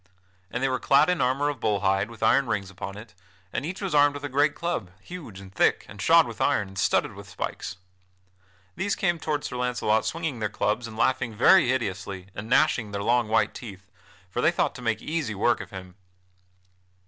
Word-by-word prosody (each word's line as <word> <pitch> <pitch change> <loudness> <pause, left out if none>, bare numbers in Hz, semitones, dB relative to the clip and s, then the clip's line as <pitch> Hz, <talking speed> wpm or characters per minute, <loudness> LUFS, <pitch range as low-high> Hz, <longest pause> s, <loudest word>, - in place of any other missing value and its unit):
And - - -3
they - - +3
were 130 -1 -1
clad 140 +6 +4
in 180 - 0
armor 130 +3 +1
of 145 -1 -2
bull 105 -2 0
hide 95 +2 +1
with 115 -1 -8
iron 135 -1 +4
rings 95 -2 -2
upon 95 +1 -7
it, 105 -2 -11 0.4
and 120 - -2
each 185 +6 -5
was 190 - -2
armed 145 -1 +5
with 145 - -7
a 145 - -3
great 145 +3 +2
club, 170 - -3
huge 145 - -9
and 95 -1 -12
thick, - - +2
and - - -10
shod - - +6
with - - -8
iron, 100 -2 +1
and 95 0 -7
studded - - +1
with - - -11
spikes. 90 - -5 1.0
These 200 +2 -1
came 175 -3 0
toward 150 -2 -2
Sir 125 - -5
Launcelot 125 -3 +1
swinging 160 -7 -3
their 110 -1 -1
clubs 110 +3 -1
and 110 -1 -10
laughing 120 -1 +1
very 165 - +6
hideously 100 -6 -3
and 105 +3 -7
gnashing 125 -5 +3
their 100 0 -4
long 120 0 +2
white 110 -1 +2
teeth, 95 -6 -10 0.4
for - - -3
they - - +5
thought - - 0
to - - -10
make 115 -2 -1
easy 155 -9 -2
work 115 +4 +2
of - - -9
him. 95 -2 -9
120 Hz, 210 wpm, -26 LUFS, 100-145 Hz, 1.0 s, shod